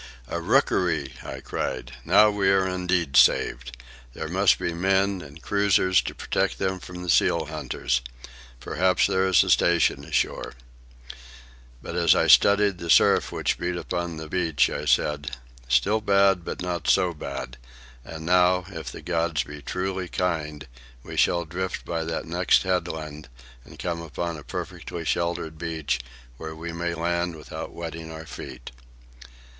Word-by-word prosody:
"A 85 +6 -3
rookery!" 80 -5 +1
I - - -7
cried. 60 0 -4
"Now 105 0 +6
are - - -1
we 100 -2 +2
indeed 90 -5 0
saved. 65 -2 +3 0.4
There - - -5
must - - +4
be 85 - -2
men 95 +2 +1
and 75 +1 -12
cruisers 100 -2 +3
to - - -6
protect - - -1
them 95 -1 -1
from 90 0 -9
the - - -7
seal 85 - +3
hunters. - - -2 0.6
Possibly 95 +8 +1 0.2
there 95 0 +2
is 95 -3 +5
a - - -4
station 85 -5 +3
ashore." - - -2 1.3
But - - -6
as 85 -2 +4
I - - +3
studied 100 -2 +5
the 85 - -6
surf - - +5
which - - -1
beat 90 +1 -2
upon 85 -1 -3
the 80 0 -7
beach, 80 -4 +1
I - - -4
said, 70 -2 0 0.3
"Still 100 - +2
bad, 100 -3 +3
but 90 - -5
not 85 -3 -2
so 90 -1 +3
bad. 70 -4 -6 0.5
And 80 +3 -8
now, 90 0 +3
if 80 -9 -7
the 80 - -10
gods 85 -2 0
be 75 0 -10
truly 95 +5 -3
kind, 75 -5 -2 0.4
we - - -8
shall 85 0 +2
drift 90 +3 -4
by 80 -1 -2
that 80 0 -3
next 85 +3 +2
headland 80 -6 -3 0.3
and - - -15
come 85 -1 -3
upon 85 +1 -4
a 75 - -10
perfectly 85 +3 -6
sheltered 80 -1 -2
beach, 80 -5 -2 0.4
where 80 +1 -7
we 85 +1 -6
may 85 0 -2
land 85 +1 -1
without 75 - -8
wetting 80 -1 -7
our 80 0 -8
feet." 65 -4 -9
85 Hz, 155 wpm, -25 LUFS, 80-90 Hz, 1.3 s, Now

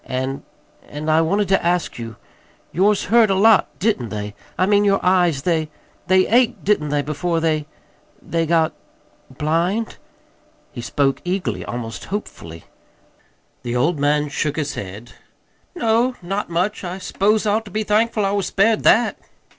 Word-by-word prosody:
"And 130 +1 -3 0.5
and 150 +2 -3
I 160 +1 +4
wanted 200 +5 +1
to 195 - +2
ask 175 -6 0
you. 115 -1 -7 0.6
Yours 200 +3 +2
hurt 225 +1 +4
a 195 - +2
lot, 215 +2 +5
didn't 180 - 0
they? 105 0 -5 0.2
I 185 - +3
mean, 205 +1 +3
your 200 -1 +3
eyes; 175 -6 +2
they 160 -3 0 0.4
they 185 0 +4
ached, 240 +1 +2
didn't 175 -8 +1
they, 145 0 0
before 165 +4 -1
they 155 -2 0 0.5
they 165 -1 -2
got 160 -1 +2 0.6
blind?" 165 - -1 0.7
He - - -7
spoke 135 +3 0
eagerly, 185 +1 -2
almost 115 -2 -6
hopefully. 85 - -7 1.0
The 120 -1 -4
old 155 +5 +1
man 150 +1 +1
shook 150 0 -2
his 145 -3 -2
head. 105 +5 -8 0.6
"No, 235 -2 +1
not 195 +3 -3
much. 180 +6 -1
I 180 +1 -4
s'pose 210 +3 0
I 205 - +2
ought 220 +1 0
to - - -10
be 215 0 -1
thankful 215 0 +1
I 195 - 0
was 200 -2 -1
spared 215 +2 +2
that." 240 - +3
175 Hz, 160 wpm, -20 LUFS, 145-205 Hz, 1.0 s, lot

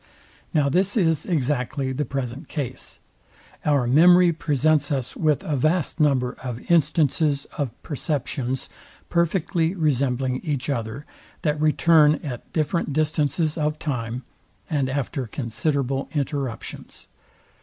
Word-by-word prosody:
Now 150 -3 +2
this 185 - +1
is 160 -6 +2
exactly 135 -4 -1
the 145 +3 -2
present 135 +2 -4
case. 145 -6 -5 0.7
Our 145 -4 +2
memory 175 +7 +6
presents 150 -1 +1
us 130 -3 -2
with 155 -3 +1
a 150 - -1
vast 155 +5 +1
number 135 -5 +2
of 125 -3 -5
instances 150 -2 +2
of 140 -3 0
perceptions 135 -3 -2 0.4
perfectly 170 0 +1
resembling 135 -5 +1
each 145 -3 -1
other, 115 +3 -4 0.4
that 150 -1 0
return 155 0 +5
at 125 -6 -7
different 160 -1 -1
distances 155 +1 0
of 150 0 0
time, 125 -4 -3 0.5
and 140 -4 +1
after 135 -2 -2
considerable 135 +3 -1
interruptions. 140 -4 -4
145 Hz, 115 wpm, -24 LUFS, 130-155 Hz, 0.7 s, memory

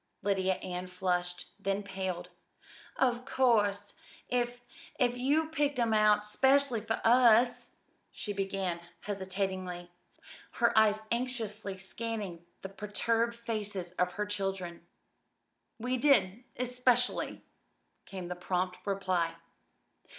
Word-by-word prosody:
Lydia 190 -2 +2
Ann 180 0 -4
flushed, 180 -1 -1
then 195 +1 -1
paled. 190 -3 -4 0.7
"Of 250 -2 +2
course, 230 -7 +2 0.4
if 245 0 0 0.4
if 245 -2 +2
you 290 +6 +2
picked 290 -3 0
'em 230 -2 +2
out 210 -1 +4
'specially 265 +2 +3
for 225 +1 -2
us 240 +1 +5 0.2
" - - -42
she 205 - -4
began 195 -3 -2 0.2
hesitatingly, 190 -3 -3 0.6
her 235 -1 +2
eyes 215 -1 +5
anxiously 225 -5 -2
scanning 195 -2 -5 0.2
the 190 - -5
perturbed 230 +4 0
faces 210 -6 -4
of 180 0 +2
her 210 +3 -1
children. 195 -4 -4 0.9
"We 250 +3 -1
did 240 -5 +3
especially," 250 0 +1 0.6
came 185 -2 -6
the 180 - -4
prompt 180 +1 -1
reply. 185 -4 0
210 Hz, 110 wpm, -31 LUFS, 190-240 Hz, 0.9 s, us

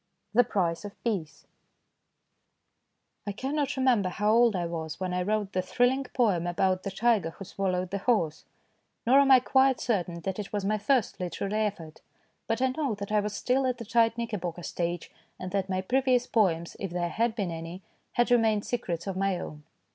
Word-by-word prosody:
THE 245 +3 +6
PRICE 170 -7 -1
OF 205 -1 -10
PEACE 170 -11 -3 1.8
I - - 0
CANNOT 275 +6 -2
remember 245 -8 +3
how 210 +3 +1
old 230 -1 +5
I 175 -2 -1
was 160 -2 -5
when 185 -1 -2
I 180 - 0
wrote 205 +1 -1
the 185 - +1
thrilling 245 +8 +1
poem 200 -10 +1
about 185 +1 +1
the 195 - -4
tiger 210 -3 +2
who 195 +4 -10
swallowed 185 -2 -2
the 200 - -2
horse, 190 -8 0 0.6
nor 260 +4 +6
am 280 -1 +4
I 260 -1 +9
quite 265 0 +3
certain 175 -7 -1
that 190 +3 -3
it 205 - -5
was 205 -2 -2
my 215 +1 +1
first 240 +1 +1
literary 200 +4 -1
effort, 165 -6 -8 0.5
but 225 +3 0
I 260 - +3
know 260 -4 -1
that 200 0 -6
I 210 - +4
was 210 0 -3
still 260 +1 +1
at 255 - -1
the 230 - -7
tight 230 +1 +3
knickerbocker 185 -7 -4
stage, 175 0 -3 0.3
and 185 0 -5
that 195 -1 -1
my 185 0 0
previous 250 +3 +2
poems, 170 -9 +1
if 195 - -3
there 175 0 -2
had 230 +4 0
been 200 -6 -2
any, 165 +3 -7 0.3
had 240 +1 +2
remained 220 -3 +3
secrets 180 -9 -3
of 195 -2 -3
my 195 -1 0
own. 150 0 -7
205 Hz, 190 wpm, -28 LUFS, 180-240 Hz, 1.8 s, I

